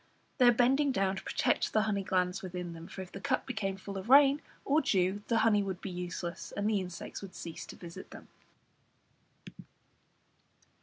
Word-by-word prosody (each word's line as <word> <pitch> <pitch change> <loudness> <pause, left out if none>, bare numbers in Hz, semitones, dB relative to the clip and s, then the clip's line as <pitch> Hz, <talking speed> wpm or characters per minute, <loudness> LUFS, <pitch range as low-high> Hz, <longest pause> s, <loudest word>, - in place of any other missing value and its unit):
They 250 - +7
are - - +9
bending 265 +4 +3
down 195 -4 0
to - - -5
protect - - 0
the 215 - +4
honey 205 -2 0
glands 185 0 0
within 180 -2 -5
them, 165 0 -9
for 190 - -7
if 180 - -14
the 195 - -8
cup - - 0
became 205 -6 -3
full 195 0 -6
of 190 +5 -9
rain 280 +1 +7 0.2
or 295 +3 +3
dew 190 - +1
the 230 - +2
honey 210 -2 +4
would 190 -2 -3
be 190 - -6
useless, 175 0 -5
and 205 +1 0
the 210 -3 +2
insects 180 -2 -7
would 195 -2 -10
cease 165 -1 -7
to - - -9
visit 170 -1 -10
them. - - -12
195 Hz, 190 wpm, -31 LUFS, 180-220 Hz, 0.2 s, are